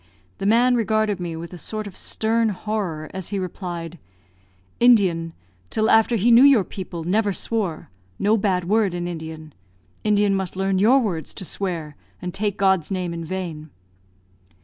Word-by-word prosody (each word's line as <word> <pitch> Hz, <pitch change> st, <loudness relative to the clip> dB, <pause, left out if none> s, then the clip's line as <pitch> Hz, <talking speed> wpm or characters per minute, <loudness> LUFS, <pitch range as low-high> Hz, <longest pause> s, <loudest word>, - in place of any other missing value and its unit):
The 195 Hz, -, -1 dB
man 240 Hz, +4 st, +4 dB
regarded 215 Hz, -3 st, +1 dB
me 170 Hz, -2 st, -4 dB
with 170 Hz, +2 st, -8 dB
a 175 Hz, -, -8 dB
sort 215 Hz, +3 st, -4 dB
of 200 Hz, -3 st, -9 dB
stern 225 Hz, +1 st, 0 dB
horror, 195 Hz, -6 st, -3 dB
as 190 Hz, -2 st, -3 dB
he 205 Hz, -, -3 dB
replied, 175 Hz, -3 st, -5 dB, 0.8 s
"Indian, 185 Hz, -9 st, +4 dB, 0.4 s
till 220 Hz, 0 st, +1 dB
after 225 Hz, +2 st, +4 dB
he 230 Hz, +3 st, +3 dB
knew 235 Hz, +1 st, +8 dB
your 275 Hz, -7 st, +6 dB
people, 180 Hz, -3 st, -7 dB
never 205 Hz, +4 st, +1 dB
swore 195 Hz, -, -2 dB, 0.3 s
no 210 Hz, +2 st, +3 dB
bad 190 Hz, -4 st, 0 dB
word 205 Hz, -3 st, +2 dB
in 175 Hz, 0 st, -3 dB
Indian. 160 Hz, -2 st, -7 dB, 0.5 s
Indian 205 Hz, -1 st, +3 dB
must 190 Hz, -2 st, -2 dB
learn 190 Hz, 0 st, 0 dB
your 230 Hz, +7 st, +5 dB
words 180 Hz, -, -2 dB
to 190 Hz, -, -4 dB
swear 165 Hz, -6 st, -4 dB, 0.2 s
and 180 Hz, -1 st, -5 dB
take 205 Hz, 0 st, -1 dB
God's 190 Hz, -5 st, +2 dB
name 180 Hz, -3 st, -2 dB
in 170 Hz, 0 st, -5 dB
vain." 165 Hz, -3 st, -5 dB
190 Hz, 165 wpm, -22 LUFS, 170-215 Hz, 0.8 s, knew